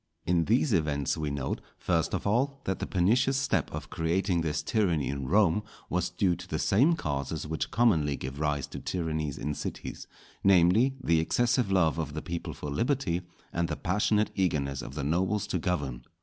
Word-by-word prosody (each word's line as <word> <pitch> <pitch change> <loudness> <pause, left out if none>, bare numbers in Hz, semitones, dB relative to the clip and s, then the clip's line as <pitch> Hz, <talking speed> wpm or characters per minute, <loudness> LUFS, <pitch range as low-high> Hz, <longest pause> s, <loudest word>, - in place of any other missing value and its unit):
In 85 -1 +2
these 120 +4 +2
events 75 -5 +1
we 75 -2 -2
note, 70 -2 -3 0.2
first - - 0
of - - -4
all, 135 +7 +1
that 95 - -2
the - - -3
pernicious 120 +9 +2
step 135 - 0
of - - -7
creating 85 +2 0
this 75 -2 -1
tyranny 85 - +1
in 70 -2 -3
Rome 100 +1 +3 0.3
was 90 0 0
due 90 0 +1
to 90 +1 -10
the - - -2
same 135 +12 +3
causes 70 - -3
which 80 +1 -3
commonly 80 -12 +3
give 65 +2 -6
rise 75 -2 0
to - - -6
tyrannies 80 -5 -2
in 75 - -2
cities; - - -6 0.4
namely, 100 +8 +5
the 80 -1 +3
excessive 120 +5 +1
love 85 -4 +3
of 75 -2 -3
the 80 - -3
people 85 -1 -5
for 75 - -6
liberty, 100 - 0 0.3
and 85 0 0
the 75 - -3
passionate 105 +3 +1
eagerness 70 -7 0
of 65 - -8
the 75 - -3
nobles 95 +7 +1
to 90 - -2
govern. 70 -9 -2
85 Hz, 185 wpm, -29 LUFS, 75-100 Hz, 0.4 s, namely